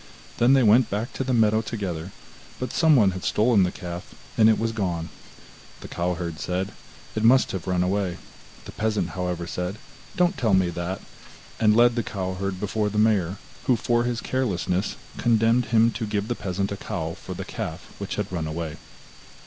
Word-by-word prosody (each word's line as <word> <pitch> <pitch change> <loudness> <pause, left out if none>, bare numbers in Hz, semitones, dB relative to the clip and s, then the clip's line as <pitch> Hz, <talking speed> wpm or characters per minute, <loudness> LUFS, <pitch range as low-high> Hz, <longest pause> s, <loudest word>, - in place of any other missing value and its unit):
Then 120 +3 +5
they 135 -2 +5
went 115 +3 +5
back 105 +4 -3
to - - -2
the 130 - -2
meadow 110 -2 +4
together, 95 -6 -4 0.5
but 125 -1 -4
someone 140 - +5
had 95 -1 -6
stolen 110 -1 +3
the 90 -1 +2
calf, 85 -1 -8 0.2
and 110 -1 +6
it 110 - +4
was 115 +1 0
gone. 90 -7 -2 0.7
The - - -8
cow 90 +1 -1
herd 85 -3 -5
said: 90 +5 -2 0.4
'It 110 - -1
must 130 +3 +5
have 95 -4 -5
run 90 -1 +2
away.' 95 -2 0 0.5
The - - -8
peasant, 110 -1 -1
however, 90 -2 -3
said: 90 +3 -4 0.4
'Don't 180 +1 +2
tell 110 -6 +3
me 90 -2 +2
that,' 85 +2 -4 0.6
and 105 -1 +4
led 120 0 +6
the 120 - 0
cow 95 -4 -3
herd 95 0 -3
before 105 +1 -1
the 105 - -4
mayor, 100 -4 +2 0.3
who 125 - +4
for 120 +1 +1
his 120 -1 -2
carelessness 100 -6 -1 0.2
condemned 115 +1 +3
him 115 0 +4
to 115 -1 -4
give 105 +1 -2
the - - +2
peasant 100 -2 -3
a 100 - -3
cow - - -4
for - - -8
the - - -5
calf 80 +3 -6
which 100 - -4
had 105 -1 -3
run 80 -3 -2
away. 80 -1 -4
100 Hz, 190 wpm, -25 LUFS, 90-115 Hz, 0.7 s, and